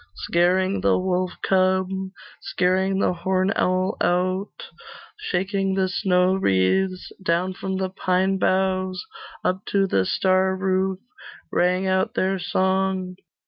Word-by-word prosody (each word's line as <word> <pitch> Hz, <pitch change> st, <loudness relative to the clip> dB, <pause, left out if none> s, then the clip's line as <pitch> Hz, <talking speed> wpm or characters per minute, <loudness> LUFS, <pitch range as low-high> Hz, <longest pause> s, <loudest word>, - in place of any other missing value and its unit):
Scaring 185 Hz, +3 st, +1 dB
the -, -, +3 dB
wolf 185 Hz, 0 st, -1 dB
cub, 185 Hz, 0 st, +2 dB, 0.5 s
Scaring 190 Hz, +1 st, 0 dB
the 190 Hz, -, +1 dB
horn 185 Hz, +3 st, 0 dB
owl 185 Hz, +3 st, 0 dB
out, 185 Hz, +3 st, -1 dB, 0.6 s
Shaking 195 Hz, +1 st, -1 dB
the 190 Hz, -1 st, +1 dB
snow 180 Hz, 0 st, +2 dB
wreaths 185 Hz, -, +1 dB
Down 180 Hz, +1 st, 0 dB
from 190 Hz, 0 st, -4 dB
the 190 Hz, -1 st, -2 dB
pine 190 Hz, +1 st, 0 dB
boughs, 185 Hz, -1 st, 0 dB, 0.4 s
Up 185 Hz, +2 st, 0 dB
to 195 Hz, -1 st, +2 dB
the 95 Hz, -, +1 dB
star 190 Hz, 0 st, +2 dB
roof 190 Hz, 0 st, 0 dB, 0.5 s
Rang 180 Hz, +2 st, +1 dB
out 190 Hz, 0 st, 0 dB
their 190 Hz, 0 st, 0 dB
song. 190 Hz, 0 st, 0 dB
185 Hz, 120 wpm, -23 LUFS, 185-190 Hz, 0.6 s, the